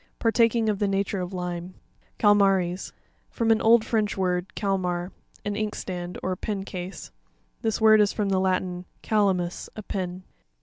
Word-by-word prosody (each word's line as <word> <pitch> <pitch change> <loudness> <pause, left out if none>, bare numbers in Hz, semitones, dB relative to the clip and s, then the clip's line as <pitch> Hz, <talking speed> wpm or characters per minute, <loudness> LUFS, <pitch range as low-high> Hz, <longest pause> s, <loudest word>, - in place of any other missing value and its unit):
Partaking 230 0 +3
of 210 -2 0
the 205 - +1
nature 195 0 -1
of 180 +1 -4
lime. 180 -1 -5 0.4
Catma''ries.—From 195 +2 +1
an 225 - +3
old 225 0 +5
French 215 -3 0
word, 180 -1 -1
calmar, 180 -3 -1 0.3
an 205 0 -1
inkstand, 185 -4 -4
or 185 - -1
a 185 - -2
pen 200 -1 -3
case; 180 -1 -7 0.5
this 220 -2 0
word 215 -1 +7
is 205 - +3
from 205 -2 -1
the 190 -1 +2
Latin, 185 -1 -1 0.2
calamus,a 195 -1 0
pen. 185 -1 -4
195 Hz, 145 wpm, -26 LUFS, 180-215 Hz, 0.5 s, word